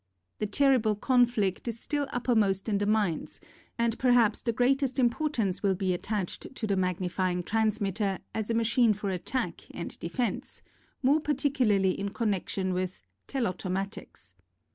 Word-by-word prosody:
The 210 - -1
terrible 240 -2 +3
conflict 235 -4 +2
is 230 -1 -3
still 290 +1 -1
uppermost 220 -7 +1
in 205 -2 +1
the 205 - 0
minds 210 -7 0 0.4
and 235 -1 0
perhaps 245 -4 +4
the 235 - 0
greatest 260 +3 +1
import 270 +4 +1
ance 195 -5 0
will 195 -2 +2
be 185 -1 0
attached 205 +6 -4
to 230 - -3
the 200 -2 +1
Magnifying 180 0 -1
Transmitter 210 -2 0 0.2
as 220 -1 -3
a 230 - +1
machine 230 0 +3
for 200 -1 -3
attack 180 +1 -3
and 170 - -7
defense, 215 +6 -3 0.4
more 280 +4 +4
particularly 255 -10 +2
in 200 0 -2
connection 195 -3 -1
with 185 0 -3 0.2
Tclautomatics. 195 -4 -4
215 Hz, 140 wpm, -29 LUFS, 190-245 Hz, 0.4 s, perhaps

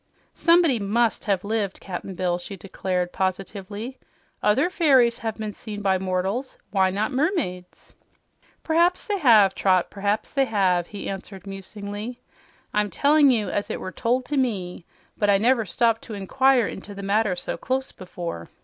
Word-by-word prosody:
"Somebody 335 -7 +4
MUST 220 +3 +1
have 195 -3 0
lived, 205 -2 -2
Cap'n 190 0 -6
Bill," 175 -1 0
she 195 +2 -8
declared 180 -1 -3
positively. 195 +5 -4 0.4
"Other 260 +10 +3
fairies 260 -9 +4
have 225 -3 -3
been 215 -2 -5
seen 205 -2 -7
by 190 -1 +2
mortals; 190 +7 -2
why 190 -2 +3
not 205 +5 -1
mermaids?" 260 - -2 0.7
"P'raps 340 +3 +2
they 410 -2 -1
have, 215 - +6
Trot, 185 -2 +2
p'raps 205 +2 -1
they 275 -1 +2
have," 185 -6 +1
he 205 - -7
answered 195 0 -7
musingly. 205 +4 -6 0.5
"I'm 210 0 +1
tellin' 285 - +4
you 225 -5 +1
as 205 - -2
it - - -3
was 185 - -6
told 250 +2 0
to 290 - -2
me, 190 -9 -2 0.3
but 205 - +2
I 200 - +6
never 230 +1 +2
stopped 230 +4 +2
to 220 - -7
inquire 255 +5 +3
into 200 +1 -7
the 200 - -7
matter 200 -1 +1
so - - -4
close 265 +1 -2
before. 175 - -7
205 Hz, 160 wpm, -24 LUFS, 190-250 Hz, 0.7 s, have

